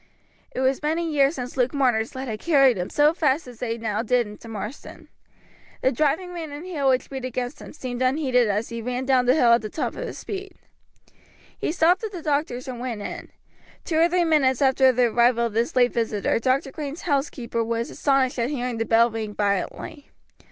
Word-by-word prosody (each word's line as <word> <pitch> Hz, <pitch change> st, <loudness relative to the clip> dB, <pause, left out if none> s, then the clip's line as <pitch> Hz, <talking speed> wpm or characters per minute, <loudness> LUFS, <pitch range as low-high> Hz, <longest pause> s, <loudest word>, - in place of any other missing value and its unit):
It 255 Hz, -, -4 dB
was 265 Hz, 0 st, +1 dB
many 320 Hz, +3 st, -1 dB
years 280 Hz, +2 st, +3 dB
since 250 Hz, -2 st, -6 dB
Luke 255 Hz, +3 st, +1 dB
Marner's 245 Hz, -5 st, +1 dB
legs 260 Hz, +1 st, -5 dB
had 215 Hz, -2 st, -4 dB
carried 275 Hz, -5 st, +4 dB
him 180 Hz, -1 st, -3 dB
so 295 Hz, +2 st, +3 dB
fast 300 Hz, -2 st, +1 dB
as 245 Hz, -2 st, -12 dB
they 230 Hz, -2 st, -2 dB
now 220 Hz, -2 st, -2 dB
did 245 Hz, +1 st, +2 dB
into 210 Hz, +2 st, -11 dB
Marsden. 220 Hz, +4 st, -8 dB, 0.7 s
The 260 Hz, -, +4 dB
driving 310 Hz, +7 st, 0 dB
rain 325 Hz, -3 st, -6 dB
and 290 Hz, +4 st, -8 dB
hail 295 Hz, -7 st, 0 dB
which 260 Hz, +1 st, 0 dB
beat 265 Hz, -1 st, -5 dB
against 255 Hz, +1 st, -4 dB
him -, -, -10 dB
seemed 255 Hz, -4 st, -6 dB
unheeded 255 Hz, -2 st, +2 dB
as 210 Hz, +3 st, -1 dB
he 235 Hz, -1 st, -5 dB
ran 250 Hz, +2 st, -3 dB
down 255 Hz, -2 st, +3 dB
the 255 Hz, -, +5 dB
hill 240 Hz, -6 st, +5 dB
at 235 Hz, -, +4 dB
the 215 Hz, -, -5 dB
top 315 Hz, -, -2 dB
of -, -, -5 dB
his -, -, -7 dB
speed. 395 Hz, -1 st, -7 dB, 1.0 s
He -, -, -2 dB
stopped 355 Hz, +4 st, +3 dB
at 435 Hz, -, -3 dB
the 345 Hz, -4 st, -7 dB
doctor's 285 Hz, -4 st, -1 dB
and 250 Hz, -2 st, -6 dB
went 240 Hz, -4 st, -4 dB
in. -, -, -7 dB, 0.6 s
Two 320 Hz, -2 st, 0 dB
or 335 Hz, +1 st, +5 dB
three 350 Hz, 0 st, +2 dB
minutes 275 Hz, -6 st, +3 dB
after 265 Hz, -1 st, +4 dB
the 250 Hz, 0 st, +2 dB
arrival 235 Hz, +1 st, +3 dB
of 230 Hz, -, -3 dB
this 230 Hz, +3 st, 0 dB
late 245 Hz, -1 st, +4 dB
visitor 225 Hz, -2 st, 0 dB
Dr. 260 Hz, +3 st, 0 dB
Green's 295 Hz, +1 st, -6 dB
housekeeper 270 Hz, -6 st, -1 dB
was 230 Hz, +1 st, -2 dB
astonished 270 Hz, -3 st, +1 dB
at 235 Hz, +2 st, 0 dB
hearing 250 Hz, -5 st, -3 dB
the 225 Hz, -, 0 dB
bell 230 Hz, +1 st, +4 dB
ring 215 Hz, -2 st, -5 dB
violently. 205 Hz, +8 st, -2 dB
255 Hz, 210 wpm, -24 LUFS, 235-290 Hz, 1.0 s, the